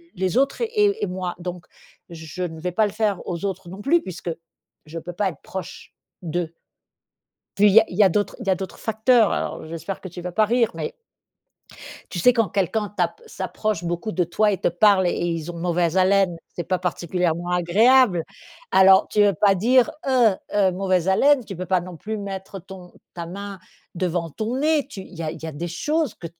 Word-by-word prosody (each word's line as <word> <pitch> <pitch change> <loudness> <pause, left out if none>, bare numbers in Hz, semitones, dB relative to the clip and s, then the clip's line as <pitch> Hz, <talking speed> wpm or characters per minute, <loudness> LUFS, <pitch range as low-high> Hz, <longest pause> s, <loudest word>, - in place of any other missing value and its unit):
les 185 +4 -1
autres 275 - +1
et 420 -2 +1
et - - +1
moi. 180 -1 -4
Donc, 180 0 -6 0.4
je 160 0 -8
ne 160 -2 -5
vais 180 +2 -3
pas 215 +4 +2
le - - -6
faire 210 -3 0
aux 175 +2 -3
autres 190 -3 -4
non 190 +3 -9
plus, 330 +8 +3
puisque 175 -1 -6 0.6
je 165 - -8
peux 175 +2 -8
pas 195 +2 0
être 170 - -12
proche 190 0 -8 0.3
d'eux. 170 0 -3 1.0
Puis 205 - +5
il - - +3
y 225 - +10
a - - +1
il 180 - -8
y - - +7
a 195 - +7
d'autres 205 +3 -1
il 235 - -7
y - - +2
a - - +4
d'autres 190 0 -7
facteurs. 220 0 +3
Alors - - -3
j'espère 165 +4 -6
que 185 - -7
tu 175 +1 -9
vas 180 0 -5
pas 215 +4 +3
rire, 235 +1 +2
mais 470 - -5 1.2
tu 180 - -5
sais 250 +9 +5
quand 230 -4 +1
quelqu'un 200 +3 -1
tape - - -1
s'approche 215 - -3
beaucoup 175 +5 -3
de 180 - +1
toi, 210 +5 +1
et 190 - -2
te - - +2
parle, 190 +2 +4
et 175 - +1
ils 165 -1 -2
ont 170 - -8
mauvaise 175 0 0
haleine. 190 -1 +3
C'est 175 - -6
pas 185 - 0
particulièrement 175 -1 -1
agréable. 190 +3 +4 0.5
Alors, 190 0 +6
tu 210 - +1
veux 200 -1 +4
pas 195 +4 +4
dire: 240 +6 +3 0.2
«Heu! 245 -6 +4 0.2
Heu, 195 -3 +3
mauvaise 185 -1 0
haleine.» 265 +7 +4
Tu 195 - -8
peux 180 +2 -5
pas 185 -1 +2
non 175 0 -9
plus 215 +6 -5
mettre 195 -1 -6
ton 185 -1 -12 0.2
ta 170 -1 -5
main 200 +2 -7 0.4
devant 175 -2 -2
ton 220 - -3
nez. 300 -1 +2
Tu 210 - -8
il 190 - -14
y 165 - -5
a 155 - -2
il - - -10
y - - -4
a 160 - -5
des 165 +4 -5
choses 300 - -1
que 170 - -8
190 Hz, 220 wpm, -23 LUFS, 175-215 Hz, 1.2 s, y